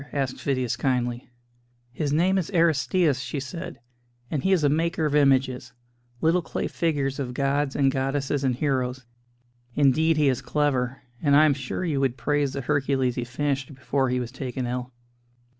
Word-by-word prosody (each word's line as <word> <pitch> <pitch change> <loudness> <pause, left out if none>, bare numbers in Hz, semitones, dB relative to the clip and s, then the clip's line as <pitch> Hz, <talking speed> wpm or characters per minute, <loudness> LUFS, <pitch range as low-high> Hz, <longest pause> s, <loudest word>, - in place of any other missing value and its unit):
asked 135 -3 -2
Phidias 130 -4 0
kindly. 125 -2 -1 0.6
"His 145 +3 -2
name 180 +6 +3
is 175 - -3
Aristćus," 165 -2 +3
she 140 +2 -4
said, 140 +3 -6 0.5
"and 150 - -1
he 190 - +2
is 180 -5 +3
a - - +5
maker 160 +2 +1
of 150 - 0
images 135 -3 +2 0.5
little 165 +3 +3
clay 160 - -4
figures 145 -4 -1
of 125 -3 -4
gods 140 +1 0
and 135 -1 +3
goddesses 135 +1 -1
and 130 -2 +1
heroes. 130 -2 -1 0.7
Indeed, 155 +3 +3
he 150 -2 +3
is 130 -3 +1
clever; 135 -3 -1 0.2
and 145 -3 +4
I 155 +2 +7
am 150 - +4
sure 135 +6 -4
you 150 -5 0
would 135 -2 0
praise 145 -2 0
the 140 - -3
'Hercules' 135 -2 +1
he 120 - -3
finished 135 +2 -2
before 135 0 0
he 125 0 0
was 120 -1 -4
taken 130 -1 -4
ill." 125 +1 -4
140 Hz, 175 wpm, -25 LUFS, 130-150 Hz, 0.7 s, I